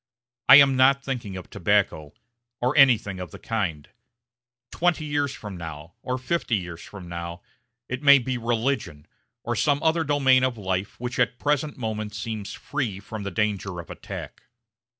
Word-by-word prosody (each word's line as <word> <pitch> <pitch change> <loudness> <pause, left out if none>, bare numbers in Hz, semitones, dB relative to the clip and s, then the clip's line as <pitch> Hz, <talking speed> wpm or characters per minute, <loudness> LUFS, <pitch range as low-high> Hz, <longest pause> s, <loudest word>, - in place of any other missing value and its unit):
I - - +12
am 140 -2 +7
not 135 +2 +4
thinking 115 -8 -4
of 90 - -9
tobacco, 75 -2 0 0.4
or 125 +3 0
anything 115 -9 +4
of 90 -2 -6
the - - -10
kind; 90 -10 -3 0.8
twenty 170 -2 +1
years 145 -2 0
from 105 -7 -8
now, 80 -1 -8
or 130 0 -2
fifty 130 -2 -1
years 85 -4 -5
from 95 -4 -10
now, 85 0 -6 0.4
it 125 +2 -4
may 140 -1 +8
be 130 0 -2
religion, 115 - -1 0.4
or 120 - -2
some 145 +4 +2
other 165 +1 +2
domain 135 -3 +4
of 130 -2 0
life 95 -1 -3
which 125 +1 -4
at 125 +1 +2
the - - -24
present 145 0 0
moment 110 -3 -4
seems 110 -2 -5
free 125 -10 -3
from 110 +2 -7
the 100 - -3
danger 100 -2 -2
of 85 - -9
attack. - - -8
115 Hz, 170 wpm, -25 LUFS, 95-135 Hz, 0.8 s, I